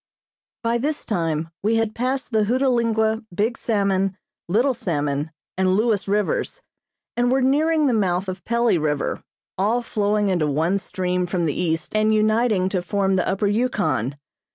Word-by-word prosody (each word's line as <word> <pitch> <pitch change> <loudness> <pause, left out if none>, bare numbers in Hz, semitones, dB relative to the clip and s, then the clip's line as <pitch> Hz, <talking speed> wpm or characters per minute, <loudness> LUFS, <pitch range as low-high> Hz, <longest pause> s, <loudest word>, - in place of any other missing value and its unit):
By 230 +1 +1
this 295 +4 -2
time 165 -5 -1
we 220 +3 +1
had 225 -1 0
passed 255 +3 -2
the 215 -2 +2
Hootalingua, 230 -2 +1
Big 210 +7 0
Salmon, 195 -4 0 0.3
Little 240 +10 +2
Salmon 145 - -2 0.3
and 185 0 +3
Lewes 215 -2 +1
rivers, 210 - -1 0.5
and 245 +1 +2
were 265 0 +2
nearing 305 +4 +3
the 260 - +2
mouth 190 -3 0
of 185 -2 -5
Pelley 235 -5 +2
River, 150 -2 -1 0.4
all 225 +5 +1
flowing 210 -2 0
into 175 -5 +1
one 160 +7 +1
stream 180 -1 -2
from 175 -1 -1
the 150 - 0
east 160 +1 -2
and 215 0 +3
uniting 215 -2 +2
to 185 -2 -1
form 195 +1 0
the 185 - +1
Upper 195 +2 0
Yukon. 200 - 0
205 Hz, 155 wpm, -22 LUFS, 180-235 Hz, 0.5 s, and